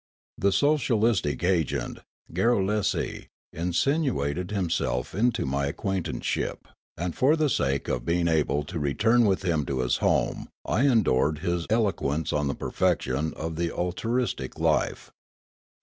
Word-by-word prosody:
The 100 - +3
socialistic 115 - +2
agent, 90 -4 0 0.3
Garrulesi, 105 +1 0 0.3
insinuated 90 - 0
himself 85 - -1
into 120 +4 +1
ni}' 70 +1 0
acquaintanceship; 95 +3 -3 0.3
and 85 +1 -3
for 140 +5 +4
the 155 -3 +1
sake 70 - 0
of - - -1
being 85 +4 +1
able 75 -3 +1
to 85 +2 -5
return 110 +12 +3
with 95 -2 +1
him 85 -5 +1
to 65 -2 -1
his 60 - +1
home - - 0 0.2
I 125 +10 +2
endured 80 - +3
his 85 -1 -1
elo 110 -2 +3
quence 75 0 -2
on 75 -1 +1
the 70 - -1
perfection 70 +5 -1
of 80 0 -5
the 85 0 -1
altruistic 90 - -2
life. - - 0
90 Hz, 135 wpm, -26 LUFS, 75-110 Hz, 0.3 s, for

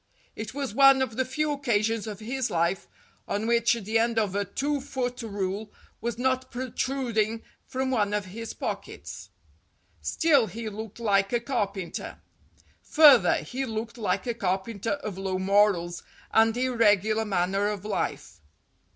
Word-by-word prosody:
It 215 +3 -6
was 275 -6 -3
one 275 +1 +6
of 225 -4 -5
the 260 - +1
few 300 +4 -1
occasions 225 -5 0
of 210 0 -6
his 250 +3 -2
life 170 +3 0 0.4
on 205 +2 -2
which 235 0 +3
the 225 0 0
end 230 0 +1
of 210 -4 +1
a 205 0 0
two 280 +8 -2
foot 255 -3 -3
rule 205 -1 -3 0.3
was 235 0 -3
not 260 +1 0
protruding 240 -3 -1 0.2
from 260 0 -2
one 210 -5 +1
of 210 -1 -1
his 230 +1 -6
pockets. - - -6 0.7
Still, 285 -8 +3
he 220 +3 -5
looked 215 +1 -8
like 195 -3 +2
a 240 - +2
carpenter. 205 -7 -3 0.6
Further, 275 - +6
he 255 - -4
looked 230 0 -5
like 215 - -1
a 240 - -1
carpenter 200 +1 -2
of 195 -3 -5
low 190 -1 -2
morals 190 -3 +2 0.3
and 225 +1 +4
irregular 220 -4 +3
manner 195 0 0
of 210 -1 -4
life. 95 - -3
225 Hz, 150 wpm, -27 LUFS, 200-250 Hz, 0.7 s, one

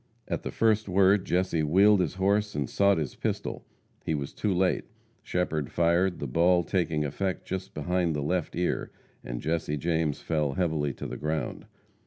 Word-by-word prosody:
At - - -2
the - - -4
first 110 -2 +1
word 95 +1 +4
Jesse 90 -2 +1
wheeled 95 +7 +5
his 90 -1 0
horse 100 +2 +1
and 70 -3 -1
sought 100 +5 +3
his 75 -4 -2
pistol. - - -4 0.4
He 80 - -1
was 70 -2 -4
too 105 - -1
late. 90 0 +1 0.4
Shepherd 80 -5 -2
fired, 85 +2 +2
the - - -4
ball 85 +6 +3
taking 80 -3 0
effect 95 +7 -3
just 95 0 -5
behind 85 +1 0
the 75 - -2
left 85 +2 -1
ear, 90 +1 -1 0.3
and - - -5
Jesse 80 -1 -1
James 80 -1 0
fell 75 -4 -1
heavily 80 -5 0
to - - -8
the - - -5
ground. 75 0 -3
85 Hz, 175 wpm, -28 LUFS, 75-95 Hz, 0.4 s, wheeled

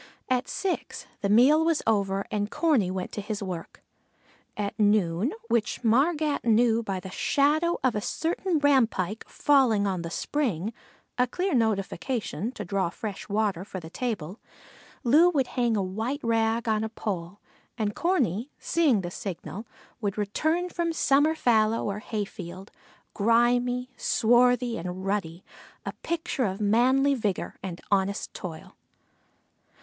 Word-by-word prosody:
At 255 0 +1
six 385 -2 -3 0.2
the 200 - 0
meal 265 +9 +6
was 325 -2 +1
over 200 -3 +1
and 205 0 -1
Corney 280 - +2
went 185 0 -4
to 210 - -4
his 210 0 -4
work. 180 -3 -7 0.7
At 205 0 -3
noon, 205 - +2 0.2
which 235 - 0
Margat 290 +6 +2
knew 230 0 +3
by 195 -4 -3
the 185 +1 -9
shadow 305 - +2
of 260 -3 +3
a 210 - -2
certain 335 - -1
rampike 230 -8 +2
falling 255 -8 +3
on 190 -3 -1
the 170 - -5
spring, 220 - -2 0.5
a 250 - +4
clear 365 +8 -1
notification 225 - -1
to 210 - -6
draw 190 -1 0
fresh 200 +3 -7
water 205 -4 0
for 190 -1 -7
the 160 -1 -11
table, 210 -6 -4 0.6
Loo 305 +9 +6
would 285 -7 +1
hang 240 -3 0
a 200 - +1
white 220 +10 -3
rag 225 0 +1
on 215 -1 +1
a 220 - -2
pole, 195 -4 -5 0.4
and 210 -3 -1
Corney, 265 - 0
seeing 295 -11 +2
the 175 -1 -5
signal, 185 +2 -6 0.3
would 200 -2 -2
return 315 - 0
from 340 -1 -1
summer 295 +1 +3
fallow 225 -5 +2
or 200 0 -2
hayfield, 195 -3 -6 0.4
grimy, 245 +3 +2
swarthy, 245 0 +3
and 180 +2 -5
ruddy, 190 -4 -2 0.4
a - - -4
picture 330 -6 -1
of 190 0 -3
manly 255 +7 +3
vigor 210 -8 -2
and 180 -3 -6
honest 200 +1 0
toil. 165 -4 -8
220 Hz, 145 wpm, -27 LUFS, 195-260 Hz, 0.7 s, meal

